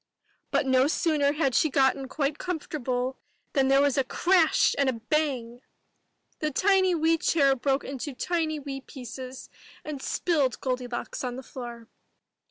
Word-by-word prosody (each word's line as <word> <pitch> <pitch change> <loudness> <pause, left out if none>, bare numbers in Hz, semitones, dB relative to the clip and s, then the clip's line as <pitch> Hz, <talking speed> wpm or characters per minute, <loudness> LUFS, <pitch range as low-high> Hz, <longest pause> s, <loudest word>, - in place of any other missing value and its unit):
But - - +1
no 260 0 +4
sooner 300 -2 +1
had 280 -4 +1
she 310 - +3
got 265 -1 +3
quite 285 0 -1
comfortable 265 -7 -3 0.3
than 270 -2 +3
there 275 +1 +5
was 285 -1 +2
a - - +3
crash 345 +5 +3
and 275 -1 +3
a - - 0
bang! 245 -1 -2 0.8
The 305 - 0
tiny 375 +3 +3
wee 325 0 +2
chair 275 -5 +3
broke 270 +2 0
into 275 0 -5
tiny 320 0 -1
wee 275 -1 -6
pieces, 255 0 -9 0.4
and 295 -3 -5
spilled 290 -6 0
Goldi 255 -1 -2
locks 240 - -4
on 250 -1 -3
the 260 - -7
floor. 240 -3 -8
275 Hz, 155 wpm, -27 LUFS, 255-310 Hz, 0.8 s, there